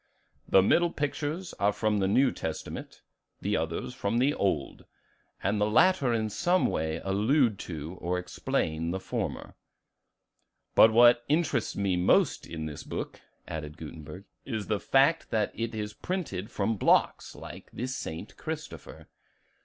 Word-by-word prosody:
"The 95 - +6
middle 170 - +4
pictures 155 +4 -3
are 100 +1 +3
from 105 0 0
the 95 - +1
New 130 +7 +4
Testament, 80 -1 -6 0.4
the - - -1
others 80 +9 -2
from 115 -2 -1
the 135 +4 +3
Old; 80 - -2 0.6
and 105 +1 +1
the 105 - +2
latter 155 +1 +4
in 110 -2 0
some 175 - +2
way 80 +1 -1
allude 110 +4 +2
to 80 +2 -6
or 90 +1 -1
explain 80 -2 -2
the 95 +2 -2
former." - - -4 1.2
"But 110 - +7
what 120 +1 +6
interests 145 -6 +1
me 95 -3 0
most 90 - +2
in 80 -2 -5
this 75 -2 -6
book," - - -6 0.3
added 75 0 -6
Gutenberg, 80 +3 -9 0.2
"is 110 -5 -4
the 105 -2 -1
fact 140 +9 +3
that 110 -2 0
it 115 0 -4
is 105 -1 -4
printed 135 - -4
from 115 -2 -1
blocks, - - +2
like - - -10
the 125 - -4
'St. 125 -11 -6
Christopher. - - -7
105 Hz, 145 wpm, -28 LUFS, 90-130 Hz, 1.2 s, But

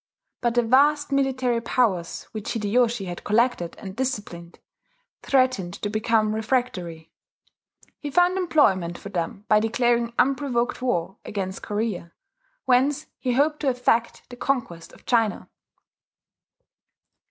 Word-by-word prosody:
But 240 -1 0
the 240 - +4
vast 285 +5 +3
military 260 -3 +1
powers 215 -8 0
which 215 -1 -4
Hideyoshi 230 0 +1
had 175 -1 -7
collected 215 -6 +1
and 190 -1 -8
disciplined, 205 -9 -4 0.6
threatened 255 -10 +1
to 205 - -4
become 215 0 +1
refractory. 215 -9 -2 0.9
He 295 - -5
found 355 +4 +3
employment 195 - +2
for 200 - -9
them 185 +2 -4
by 215 - +5
declaring 235 +1 +1
unprovoked 255 -3 +1
war 190 -7 -1
against 190 -2 -4
Korea, 205 -5 -3 0.5
whence 270 +4 +2
he 250 -2 -1
hoped 300 +4 +2
to 285 - +1
effect 240 -2 0
the 245 - -10
conquest 235 -12 -2
of - - -19
China. 225 -4 0
235 Hz, 120 wpm, -24 LUFS, 200-260 Hz, 0.9 s, by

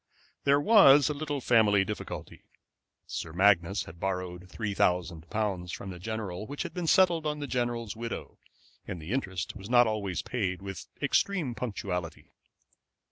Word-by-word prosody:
There 140 0 +5
was 145 - +7
a - - 0
little 145 -1 -3
family 105 -5 +4
difficulty. 105 +2 -6 0.6
Sir 80 - -5
Magnus 95 0 +3
had 85 +1 -12
borrowed 90 -1 -3
three 105 +1 -3
thousand 85 -4 0
pounds 100 -5 -2
from 95 - -6
the 90 - -9
general 105 -1 -4
which 145 - -4
had - - -7
been 175 -2 -3
settled 170 -2 +4
on 150 0 -1
the 145 - -4
general's 120 -4 -2
widow, 115 +1 -6 0.5
and 90 - -5
the 80 +5 -7
interest 95 -8 -2
was 100 +1 -9
not 120 0 +6
always 105 -5 -2
paid 95 -7 -2
with 95 -1 -7 0.2
extreme 155 -2 +1
punctuality. 95 -8 -4
105 Hz, 155 wpm, -29 LUFS, 90-135 Hz, 0.6 s, was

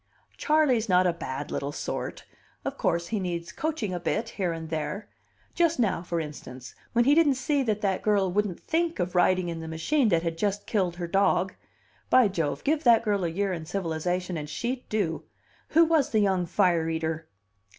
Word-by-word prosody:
"Charley's 270 -8 +2
not 180 0 +5
a 175 - +3
bad 145 -4 -5
little 140 +1 -2
sort. - - -5 0.4
Of - - -2
course, 170 0 0
he 220 - -1
needs 170 -2 -3
coaching 295 - -2
a 175 - -2
bit 215 +7 -1
here 190 -6 -2
and 165 -1 -6
there 185 +6 -3 0.5
just 335 -1 +2
now, 205 -7 +1
for 170 -1 -2
instance, 130 -5 -8 0.2
when 235 0 +3
he 280 - +5
didn't 300 -3 +4
see 275 +2 0
that 215 -5 -1
that 195 -3 0
girl 200 -3 +2
wouldn't 205 -2 -1
think 335 +1 -1
of 180 0 -2
riding 180 0 +3
in 165 -1 -4
the 160 - -6
machine 220 - +1
that 170 -3 +2
had 165 -1 -3
just 205 +1 -1
killed 185 -5 0
her 175 0 -4
dog. 190 +1 +2 0.6
By 250 -5 +6
Jove, 160 -6 -2
give 305 +2 +1
that 235 -2 +6
girl 205 -4 0
a - - +1
year 195 +3 -1
in 165 -2 -6
civilization 180 0 -2
and 150 -1 -5
she'd 245 +9 -4
do! 195 -7 -1 0.4
Who 330 +2 +5
was 315 -3 +2
the 220 -6 +2
young 190 -4 +2
fire 170 -2 +2
eater?" 160 0 -2
185 Hz, 195 wpm, -27 LUFS, 165-230 Hz, 0.6 s, By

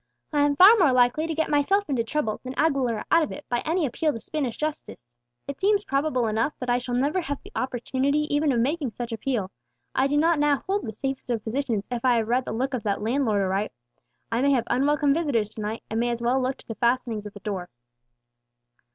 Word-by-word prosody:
I 295 - +2
am 290 0 +3
far 385 +9 +9
more 330 -8 +5
likely 250 +5 +3
to 325 - -3
get 320 +1 0
myself 390 +8 +2
into 260 -5 0
trouble, 225 -3 -2
than 255 0 -6
Aguilera 265 -8 +1
out 335 - +6
of 310 - -2
it, 295 - -8
by 240 - +1
any 330 0 +1
appeal 300 +4 0
to 230 - -6
Spanish 270 -1 -3
justice. 290 - -5 0.3
It 280 -1 -6
seems 405 +1 +3
probable 275 - 0
enough 225 +6 0
that 250 -1 -2
I 245 - +2
shall 245 0 -3
never 290 +8 +1
have 285 -3 -3
the - - -13
opportunity 260 +3 0
even 295 0 +2
of 240 - +1
making 275 0 -1
such 240 +2 -5
appeal; 225 -4 -2 0.4
I 265 - +2
do 290 +1 0
not 325 +1 +3
now 290 -2 +2
hold 395 - -1
the - - -3
safest 270 +4 -5
of 230 -3 -1
positions, 230 -3 -2
if 240 -1 -3
I 250 -2 +4
have 225 -2 0
read 250 +2 +1
the - - -4
look 260 +5 -2
of 250 - -1
that 205 -1 -2
landlord 225 -4 +1
aright. 195 +2 -1 0.6
I 230 +2 +1
may 280 - +3
have 240 -3 +1
unwelcome 285 +2 +2
visitors 280 -10 0
to 220 - -7
night, 215 +2 -4
and 220 - 0
may 240 +1 +1
as 235 -1 -2
well 255 +3 +2
look 255 +1 -1
to - - -17
the 225 - -4
fastenings 235 -2 0
of 205 - -11
the - - -9
door." 190 -4 -4
255 Hz, 235 wpm, -25 LUFS, 230-290 Hz, 0.6 s, far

